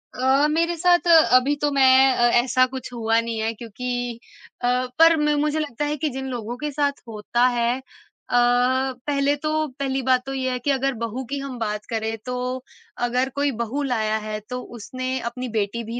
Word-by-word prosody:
अ, 265 +3 +3
मेरे 335 +3 +1
साथ 350 +1 +3 0.3
अभी 265 +3 +4
तो 295 - +2
मैं 265 -1 +5
अ, 240 -1 +3 0.2
ऐसा 255 0 +3
कुछ 260 -1 -6
हुआ 225 -1 +1
नहीं 230 -1 -3
है 225 +1 -1
क्योंकि 245 +1 -5 0.4
अ, 245 - 0 0.3
पर 330 0 +7
मे 300 0 +2
मुझे 300 +1 0
लगता 295 -1 -3
है 300 +1 -2
कि 305 0 -1
जिन 265 +1 -5
लोगों 240 0 -5
के 300 +1 -4
साथ 285 0 -1
होता 225 +3 0
है, 240 0 +1
अ, - - -14 1.3
पहले 285 0 +2
तो 310 +1 -1
पहली 270 -1 -1
बात 255 0 +2
तो 270 - -5
ये 260 -1 -1
है 250 - -2
कि 280 +4 0
अगर 270 0 0
बहू 230 +3 -3
की 280 - -3
हम 275 -2 -6
बात 210 -1 -3
करें 225 -1 -2
तो 250 0 -3 0.4
अगर 250 +2 +1
कोई 285 0 +1
बहू 240 +5 -2
लाया 220 -4 0
है 215 0 -4
तो 250 0 -4 0.2
उसने 255 +3 -4
अपनी 250 +1 -6
बेटी 220 +1 -2
भी 230 +2 -5
255 Hz, 195 wpm, -23 LUFS, 235-280 Hz, 1.3 s, पर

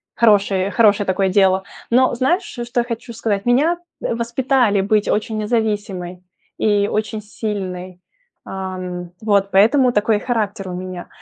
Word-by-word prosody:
хорошее 200 -3 +3
хорошее 210 -3 +3
такое 190 +1 +1
дело. 190 0 +3 0.3
Но 255 +2 +3
знаешь, 305 +10 +1
что 240 -5 -3
я - - -2
хочу 235 0 -6
сказать? 210 -3 -2
Меня, 285 +8 +3 0.2
э, - - -1
воспитали 235 -2 +1
быть 210 +1 +1
очень 215 +1 -1
независимой 205 -5 -2 0.4
и 205 -1 +2
очень 215 0 -2
сильной. 185 -4 -5 0.4
Ам, 185 -2 -6
вот 200 -2 +2
поэтому 245 +6 +4
такой 210 0 +2
характер 210 -4 -2
у 180 - -5
меня. 180 -1 -6
210 Hz, 140 wpm, -19 LUFS, 190-235 Hz, 0.4 s, поэтому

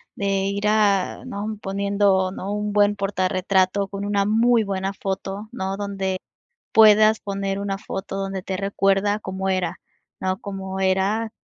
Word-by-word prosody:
de 195 -1 0
ir 200 +1 -2
a 205 -3 +2
¿no?, 210 +1 -4
poniendo, 200 -1 +1
¿no?, 195 +1 -5
un 210 0 -2
buen 205 0 +3
portarretrato 190 0 +1
con 200 +1 -5
una 205 -1 +1
muy 225 +2 +3
buena 195 -1 -2
foto, 195 +2 -4
¿no?, 190 -5 -3
donde 195 -2 -3 0.5
puedas 215 0 +6
poner 195 -1 -3
una 200 -1 -2
foto 195 0 -5
donde 195 -1 -3
te 190 0 -3
recuerda 195 +1 +1
cómo 190 -1 -4
era, 185 -3 -1 0.4
¿no?, 185 0 -1
cómo 190 -1 -5
era 195 +4 +1
195 Hz, 145 wpm, -23 LUFS, 190-205 Hz, 0.5 s, puedas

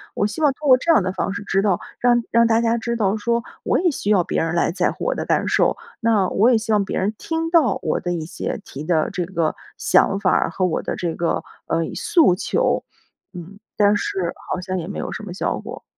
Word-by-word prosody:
我 - - +1
希 210 +8 -4
望 295 -2 +4
通 295 +2 -6
过 255 - +8
这 335 +6 +1
样 215 - +4
的 185 - -1
方 190 +1 -2
式 200 - -5
知 195 -1 +1
道 195 -3 +1 0.2
让 240 -1 +3
让 235 0 +4
大 225 0 +3
家 230 0 +1
知 235 +1 -2
道 210 -2 +1
说 235 +2 0 0.2
我 - - +1
也 355 -1 +2
需 210 - -4
要 190 -4 +4
别 - - -1
人 165 +1 -1
来 170 - +2
在 180 0 0
乎 - - -8
我 - - 0
的 - - -3
感 - - +1
受， - - +2 0.2
那 220 -5 +2
我 225 +5 +3
也 235 - +4
希 220 0 -3
望 205 -2 +3
别 - - -3
人 200 +3 0
听 325 0 -2
到 305 - +3
我 - - -1
的 175 - -2
一 165 -2 -3
些 175 - -5
提 140 - -8
的 160 -2 +1
这 180 - -2
个 170 -3 -1 0.2
想 195 - +3
法 190 -3 +2
儿 - - +2
和 190 - -2
我 175 - 0
的 - - -3
这 170 -2 -3
个， 170 - -1 0.2
呃， 165 - 0
诉 315 - +3
求， - - 0 0.5
嗯。 180 +3 -10 0.2
但 205 0 +5
是 185 -4 -2 0.2
好 - - -1
像 185 +1 -3
也 165 - -6
没 200 - -6
有 - - -4
什 - - -6
么 190 -4 -7
效 190 - -2
果， - - -9
200 Hz, 270 characters per minute, -21 LUFS, 180-235 Hz, 0.5 s, 过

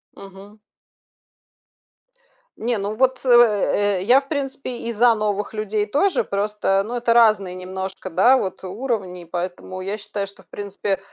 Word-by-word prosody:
Мгм. 195 +2 -13 2.0
Не, 235 +1 -1
ну 205 +1 -3
вот, 260 +1 +1
э, 210 -4 +4
э, - - -3
я, 250 +7 +5
в 275 - -20
принципе, 270 -4 -3
и 235 0 -4
за 235 +1 +4
новых 210 0 -2
людей 215 0 -1
тоже, 345 - +1
просто, 200 -1 0
ну, 235 - -6
это 240 -1 0
разные 215 -6 +4
немножко, 190 0 -6
да, 245 +10 +5
вот 190 -5 -4
уровни, 190 -3 -4
и - - -15
поэтому 180 +2 -5
я 200 +3 -3
считаю, 200 -1 -4
что, 200 - -16
в - - -40
принципе, 200 -1 -3
205 Hz, 155 wpm, -22 LUFS, 195-235 Hz, 2.0 s, я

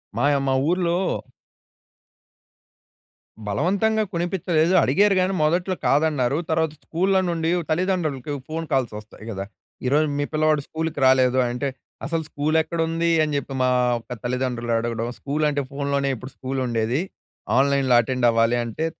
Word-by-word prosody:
మాయ 145 0 +2
మా 135 - +2 0.2
ఊర్లో 175 -1 +1 2.5
బలవంతంగా 200 - +1
కొనిపించలేదు 175 -1 +1
అడిగారు 205 0 +3
గానీ 190 +1 +1
మొదట్లో 175 +4 +1
కాదన్నారు. 145 -2 +2
తర్వాత 160 -1 +1
స్కూల్‌లో 190 +3 +1
నుండి 165 -1 -1 0.2
తల్లిదండ్రులకి 155 -6 -1 0.2
ఫోన్ 165 +1 -4
కాల్స్ 130 -5 +1
వస్తాయి 110 0 -14
కదా! 95 -2 -4 0.4
"ఈరోజు 150 +4 +3
మీ 145 - +1
పిల్లవాడు 155 -1 +2
స్కూల్‌కి 160 -2 -3
రాలేదు" 130 -1 +4
అంటే, 125 +3 -2 0.4
"అసలు 165 -1 -1
స్కూల్ 150 +2 0
ఎక్కడుంది?" 165 +1 -1
అని 150 -1 -1
చెప్పి 140 -1 -5
మా 130 - +3 0.3
యొక్క 125 +2 -8
తల్లిదండ్రులు 120 -2 -2
అడగడం, 115 0 -2
స్కూల్ 150 +2 -1
అంటే 145 -1 -1
ఫోన్‌లోనే 140 -1 -1
ఇప్పుడు 130 +3 -9
స్కూల్ 130 0 -3
ఉండేది. 115 +4 0 0.6
ఆన్‌లైన్‌లో 135 -2 +3
అటెండ్ 125 +1 0
అవ్వాలి 115 +1 +2
అంటే, 115 +8 -3
145 Hz, 135 wpm, -23 LUFS, 130-165 Hz, 2.5 s, రాలేదు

